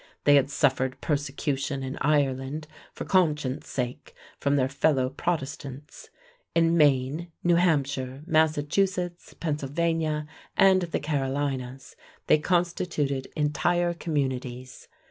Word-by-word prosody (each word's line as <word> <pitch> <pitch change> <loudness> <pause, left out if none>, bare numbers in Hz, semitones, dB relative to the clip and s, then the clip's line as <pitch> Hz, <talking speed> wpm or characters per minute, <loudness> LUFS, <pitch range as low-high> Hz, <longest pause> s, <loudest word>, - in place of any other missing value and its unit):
They 145 - +6
had 140 -1 +4
suffered 130 -3 +1
persecution 140 -2 -2
in 130 +1 -5
Ireland 145 0 0 0.2
for - - -7
conscience 150 -8 +1
sake 125 -1 -4 0.2
from 140 0 +1
their 130 -2 +2
fellow 135 -2 +1
Protestants. 145 -3 -4 0.5
In 165 0 +4
Maine, 150 +2 +2
New 175 -1 +4
Hampshire, 140 -5 0
Massachusetts, 170 +3 0
Pennsylvania, 155 +1 -1 0.3
and 190 -1 +6
the 170 -2 -2
Carolinas 135 -2 -3 0.3
they 155 - +4
constituted 165 -5 0
entire 170 +4 +1
communities. 130 -6 -3
145 Hz, 105 wpm, -27 LUFS, 135-165 Hz, 0.5 s, They